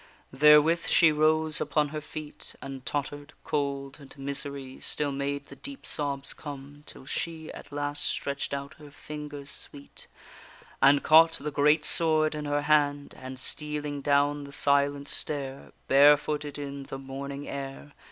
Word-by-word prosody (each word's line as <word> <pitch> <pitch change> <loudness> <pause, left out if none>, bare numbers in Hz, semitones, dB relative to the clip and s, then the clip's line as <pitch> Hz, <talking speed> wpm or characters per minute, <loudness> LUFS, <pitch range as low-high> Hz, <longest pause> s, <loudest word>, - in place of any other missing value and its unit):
Therewith 150 +3 +6
she 160 -2 +5
rose 155 0 +2
upon 150 -1 +1
her 155 +1 -5
feet, 150 0 -9
And 135 -1 -8
totter'd; 145 +2 -4
cold 140 -1 -2
and 140 0 -13
misery 140 -1 -4
Still 145 -1 0
made 140 +1 -3
the - - -12
deep 280 0 -9
sobs 140 -2 -2
come, 145 0 -9
till - - -11
she 160 +2 -4
At - - -11
last 145 0 -1
stretch'd 140 0 -2
out 140 +1 -4
her 150 -1 -12
fingers 145 -1 -7
sweet, 140 -1 -6 0.7
And 140 +1 +6
caught 165 +1 +7
the 150 -1 -3
great 150 +2 +3
sword 155 -2 +3
in 150 -1 -4
her 145 0 0
hand; 145 -2 +2
And, 130 0 -8
stealing 150 +1 -3
down 145 +1 +2
the 140 - -11
silent 140 0 +1
stair, 140 -2 -4 0.2
Barefooted 145 +1 +4
in 140 -1 -6
the 135 - -6
morning 140 +1 -6
air. 140 +1 -6
145 Hz, 150 wpm, -28 LUFS, 140-150 Hz, 0.7 s, caught